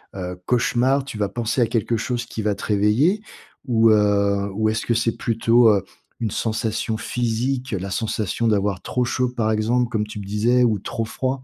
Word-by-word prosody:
heu, 90 -1 -5
cauchemar, 125 +3 +2
tu 125 -6 -7
vas 105 -2 -1
penser 120 +1 -1
à 115 - +3
quelque 115 0 0
chose 120 +1 -2
qui 110 - -6
va 105 -1 +1
te - - -9
réveiller? 110 - +2 0.5
Ou 115 -2 +4
heu, 100 -1 +2
ou 110 +1 +1
est-ce 110 0 -2
que 120 - +1
c'est 115 0 0
plutôt, 115 0 +3
heu, 100 -3 +3 0.4
une 110 -4 -2
sensation 110 0 -2
physique? 125 +3 -2
La 95 0 -3
sensation 110 +2 -1
d'avoir 100 -3 +1
trop 125 - -1
chaud, 125 0 0
par 110 -3 -1
exemple, 115 +3 +1
comme 110 -3 -1
tu 105 - -7
me 100 - -7
disais, 115 +5 +2
ou 110 -4 +2
trop 115 +3 -4
froid? 130 +3 -3
115 Hz, 195 wpm, -22 LUFS, 105-120 Hz, 0.5 s, Ou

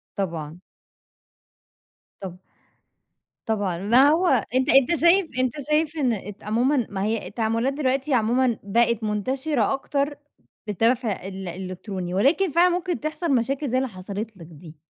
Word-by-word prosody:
طبعًا. 165 -4 -4 1.6
طَب 185 -2 -7 1.1
طبعًا، 205 -6 -1
ما 240 +9 +5
هو 340 +4 +2 0.3
أنت 260 +2 +2
أنت 270 +5 +5
شايف 345 +2 +4
أنت 255 -1 +1 0.2
شايف 310 +1 +1
إن 255 -5 +1
أت 205 0 -8
عمومًا 240 +4 +1
ما 195 -1 -3
هي 220 +1 -2
التعاملات 230 +4 -1
دلوقتي 270 0 -1
عمومًا 240 +1 +2
بقت 230 +2 +1
منتشرة 255 +5 0
أكتر 280 +1 -2 0.5
بالدفع 225 -1 0
ال 190 -1 -7
الإلكتروني، 185 0 -6
ولكن 295 - +2
فعلًا 350 +4 +4
ممكن 355 0 -2
تحصل 310 -1 -1
مشاكل 265 +4 -1
زي 255 - +1
اللي 260 -1 0
حصلت 200 +2 -7
لك 165 -2 -12
دي. 160 +1 -13
235 Hz, 135 wpm, -24 LUFS, 200-275 Hz, 1.6 s, ما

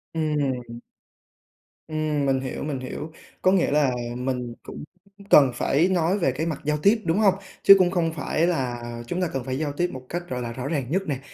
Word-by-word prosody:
Ừm. 135 -7 -2 1.1
Ừm, 155 -2 -1
mình 135 -1 +2
hiểu, 130 -1 -5
mình 145 -3 -3
hiểu, 145 +5 -6 0.3
có 185 - +4
nghĩa 190 -6 +2
là 145 -3 +3 0.3
mình 125 -1 -3
cũng - - -9 0.4
c 200 0 -16
cần 135 -4 +7
phải 145 +8 +2
nói 180 0 +1
về 150 -8 +2
cái 155 +6 -3
mặt 160 -3 -3
giao 150 0 +1
tiếp, 205 +8 +3
đúng 165 +2 +1
hông? 200 -3 +5 0.3
Chứ 195 - +10
cũng 180 -1 +3
không 165 -3 0
phải 160 +2 0
là 125 -8 -1 0.3
chúng 175 +8 -2
ta 180 - +1
cần 135 -2 -2
phải 130 +1 -3
giao 145 -1 -2
tiếp 175 +4 0
một 130 -1 -8
cách, 175 +1 -5
gọi 125 -1 -3
là, 120 -1 -4
rõ 125 +3 -5
ràng 140 -5 -1
nhất 190 +3 +1
nè, 140 -3 -2
150 Hz, 215 wpm, -24 LUFS, 130-175 Hz, 1.1 s, Chứ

